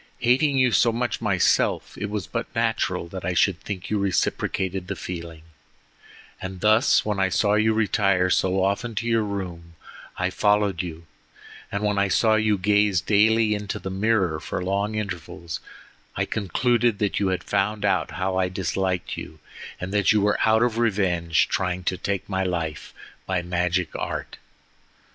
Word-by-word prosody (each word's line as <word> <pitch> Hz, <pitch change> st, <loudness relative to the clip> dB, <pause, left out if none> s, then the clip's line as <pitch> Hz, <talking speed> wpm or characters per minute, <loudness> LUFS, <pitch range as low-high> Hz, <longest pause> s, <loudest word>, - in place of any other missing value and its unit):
Hating 135 Hz, +4 st, +3 dB
you 130 Hz, -2 st, +4 dB
so 115 Hz, +1 st, +4 dB
much 120 Hz, +2 st, -2 dB
myself, 100 Hz, -5 st, +1 dB
it 105 Hz, -, -4 dB
was 105 Hz, -3 st, -3 dB
but -, -, -4 dB
natural -, -, 0 dB
that 95 Hz, +1 st, -7 dB
I 90 Hz, +1 st, -1 dB
should 90 Hz, -1 st, +2 dB
think 95 Hz, -2 st, -6 dB
you 105 Hz, -, +1 dB
reciprocated 95 Hz, -1 st, -1 dB
the -, -, -3 dB
feeling, 85 Hz, -3 st, -7 dB, 1.0 s
and 95 Hz, 0 st, -6 dB
thus 110 Hz, +5 st, +4 dB
when 105 Hz, -2 st, -1 dB
I 95 Hz, -1 st, +2 dB
saw 100 Hz, +2 st, +2 dB
you 110 Hz, +1 st, +3 dB
retire 100 Hz, -4 st, +2 dB
so 95 Hz, 0 st, +2 dB
often 100 Hz, +4 st, -1 dB
to 115 Hz, -, -2 dB
your 115 Hz, -1 st, +2 dB
room 90 Hz, -5 st, -5 dB, 0.4 s
I 90 Hz, +1 st, 0 dB
followed 105 Hz, -2 st, +2 dB
you, 85 Hz, -2 st, -8 dB, 0.7 s
and 100 Hz, +1 st, -2 dB
when 105 Hz, -1 st, +1 dB
I 100 Hz, -, +3 dB
saw 110 Hz, +4 st, +3 dB
you 110 Hz, -1 st, +2 dB
gaze 105 Hz, 0 st, +3 dB
daily 110 Hz, +3 st, +3 dB
into 105 Hz, -1 st, -3 dB
the 95 Hz, -, -6 dB
mirror 95 Hz, -5 st, +1 dB
for 80 Hz, +4 st, -4 dB
long 100 Hz, +3 st, -1 dB
intervals, 90 Hz, -5 st, -5 dB, 0.6 s
I -, -, 0 dB
concluded 120 Hz, +3 st, +1 dB
that 100 Hz, -1 st, 0 dB
you 100 Hz, -, +1 dB
had 95 Hz, -1 st, -1 dB
found 105 Hz, +2 st, 0 dB
out -, -, +1 dB
how 95 Hz, 0 st, -1 dB
I 95 Hz, -1 st, +1 dB
disliked 95 Hz, 0 st, -2 dB
you, 80 Hz, -, -8 dB, 0.4 s
and 90 Hz, +2 st, -5 dB
that 100 Hz, -2 st, +3 dB
you 110 Hz, -, +4 dB
were 105 Hz, 0 st, +1 dB
out 110 Hz, +1 st, +4 dB
of 115 Hz, -2 st, 0 dB
revenge 90 Hz, -7 st, +1 dB
trying 90 Hz, -1 st, -1 dB
to 90 Hz, -, 0 dB
take 100 Hz, 0 st, -3 dB
my 95 Hz, -1 st, -1 dB
life 85 Hz, -4 st, -3 dB, 0.4 s
by 90 Hz, -, -1 dB
magic 90 Hz, -1 st, -1 dB
art. -, -, -4 dB
100 Hz, 170 wpm, -24 LUFS, 90-105 Hz, 1.0 s, you